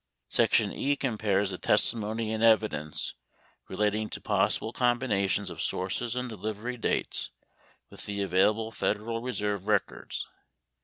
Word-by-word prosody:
Section -, -, +3 dB
E 145 Hz, +1 st, +1 dB
compares 105 Hz, -7 st, 0 dB
the 90 Hz, -, -5 dB
testimony 110 Hz, 0 st, +1 dB
and 110 Hz, +1 st, -1 dB
evidence 110 Hz, -9 st, +2 dB, 0.5 s
relating 105 Hz, +2 st, 0 dB
to -, -, -5 dB
pos -, -, +2 dB
sible 110 Hz, -, -6 dB
combinations 115 Hz, -6 st, +1 dB
of -, -, -6 dB
sources 95 Hz, +6 st, -1 dB
and 125 Hz, 0 st, -2 dB
delivery 110 Hz, +2 st, -4 dB
dates 115 Hz, -, -1 dB, 0.6 s
with -, -, -8 dB
the 100 Hz, -1 st, -2 dB
avail 95 Hz, +1 st, +4 dB
able 110 Hz, +1 st, -3 dB
Federal 115 Hz, +1 st, -1 dB
Reserve 105 Hz, -5 st, -2 dB
records. 105 Hz, -2 st, -1 dB
110 Hz, 135 wpm, -29 LUFS, 100-115 Hz, 0.6 s, avail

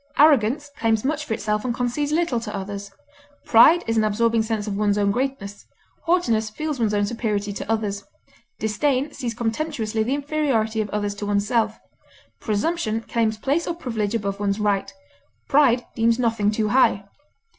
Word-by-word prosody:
Arrogance 285 Hz, -1 st, +4 dB
claims 225 Hz, 0 st, +1 dB
much 300 Hz, +1 st, -1 dB
for 225 Hz, -, -2 dB
itself 210 Hz, -1 st, -2 dB
and 245 Hz, -2 st, -2 dB
concedes 250 Hz, +5 st, -1 dB
little 315 Hz, -6 st, +1 dB
to 210 Hz, -2 st, -6 dB
others. 200 Hz, +1 st, -6 dB, 0.6 s
Pride 300 Hz, +10 st, +6 dB
is 225 Hz, 0 st, -1 dB
an 220 Hz, -, +3 dB
absorbing 225 Hz, +2 st, +2 dB
sense 220 Hz, -2 st, -2 dB
of 205 Hz, -2 st, -3 dB
one's 205 Hz, 0 st, +1 dB
own 200 Hz, -1 st, +2 dB
greatness; 220 Hz, -5 st, -4 dB, 0.4 s
haughtiness 230 Hz, -12 st, +2 dB
feels 300 Hz, +4 st, -4 dB
one's 220 Hz, -3 st, +1 dB
own 205 Hz, 0 st, +2 dB
superiority 210 Hz, -2 st, -2 dB
to 205 Hz, -, -4 dB
others; 205 Hz, -2 st, -1 dB, 0.5 s
disdain 260 Hz, +7 st, 0 dB
sees 235 Hz, -3 st, -4 dB
contemptuously 230 Hz, -1 st, -2 dB
the 245 Hz, +5 st, 0 dB
inferiority 275 Hz, -7 st, 0 dB
of 210 Hz, -, -4 dB
others 205 Hz, 0 st, -2 dB
to 205 Hz, 0 st, -6 dB
oneself. 215 Hz, +2 st, +1 dB, 0.6 s
Presumption 225 Hz, +1 st, -1 dB
claims 225 Hz, -1 st, -1 dB
place 285 Hz, +9 st, -1 dB
or 340 Hz, -, -2 dB
privilege 225 Hz, -9 st, -3 dB
above 200 Hz, -2 st, -2 dB
one's 200 Hz, 0 st, -1 dB
right; 205 Hz, -2 st, 0 dB, 0.6 s
pride 260 Hz, -4 st, +4 dB
deems 230 Hz, 0 st, +2 dB
nothing 230 Hz, -4 st, +1 dB
too 215 Hz, 0 st, 0 dB
high. 225 Hz, -4 st, +3 dB
225 Hz, 165 wpm, -23 LUFS, 210-260 Hz, 0.6 s, Pride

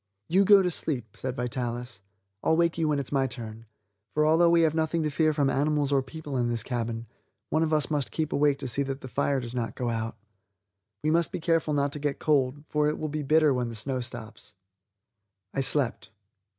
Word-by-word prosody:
"You 190 Hz, +4 st, +4 dB
go 200 Hz, -1 st, +7 dB
to 180 Hz, -, 0 dB
sleep," 120 Hz, -10 st, -2 dB
said 130 Hz, -1 st, -4 dB
Vitalis; 120 Hz, -2 st, -4 dB, 0.4 s
"I'll 160 Hz, -, +3 dB
wake 170 Hz, 0 st, +2 dB
you 160 Hz, -, +2 dB
when 150 Hz, -1 st, +1 dB
it's 140 Hz, -2 st, -4 dB
my 135 Hz, -2 st, +2 dB
turn, 115 Hz, -2 st, -8 dB, 0.5 s
for 150 Hz, 0 st, +3 dB
although 165 Hz, +2 st, +5 dB
we 170 Hz, 0 st, +5 dB
have 160 Hz, -2 st, +3 dB
nothing 160 Hz, 0 st, 0 dB
to 150 Hz, -, -1 dB
fear 155 Hz, +2 st, +2 dB
from 145 Hz, -2 st, +1 dB
animals 145 Hz, +1 st, +1 dB
or 140 Hz, -1 st, +3 dB
people 140 Hz, +1 st, -6 dB
in 120 Hz, -1 st, +1 dB
this 115 Hz, -2 st, -1 dB
cabin, 115 Hz, -2 st, -3 dB, 0.5 s
one 155 Hz, -, +2 dB
of 160 Hz, -1 st, +1 dB
us 155 Hz, 0 st, +2 dB
must 145 Hz, -3 st, 0 dB
keep 155 Hz, -2 st, -2 dB
awake 145 Hz, -1 st, +3 dB
to 135 Hz, -, -5 dB
see 130 Hz, +3 st, -1 dB
that 135 Hz, 0 st, -3 dB
the -, -, -7 dB
fire 140 Hz, +1 st, 0 dB
does 120 Hz, -1 st, -7 dB
not 120 Hz, -2 st, -3 dB
go 120 Hz, -2 st, -2 dB
out. 115 Hz, -1 st, -3 dB, 0.9 s
We 155 Hz, -, +2 dB
must 170 Hz, 0 st, +2 dB
be -, -, -3 dB
careful 165 Hz, -2 st, +1 dB
not 140 Hz, 0 st, +1 dB
to 150 Hz, -, -5 dB
get 145 Hz, -1 st, -1 dB
cold, 145 Hz, -1 st, +1 dB
for 150 Hz, 0 st, +1 dB
it 150 Hz, -, -2 dB
will 155 Hz, -, -3 dB
be 155 Hz, +1 st, -3 dB
bitter 155 Hz, 0 st, +4 dB
when 125 Hz, -2 st, -1 dB
the 115 Hz, -, -7 dB
snow 130 Hz, +4 st, -3 dB
stops." 110 Hz, -3 st, -8 dB, 1.0 s
I 135 Hz, -, 0 dB
slept. 125 Hz, -8 st, +1 dB
140 Hz, 220 wpm, -27 LUFS, 125-155 Hz, 1.0 s, go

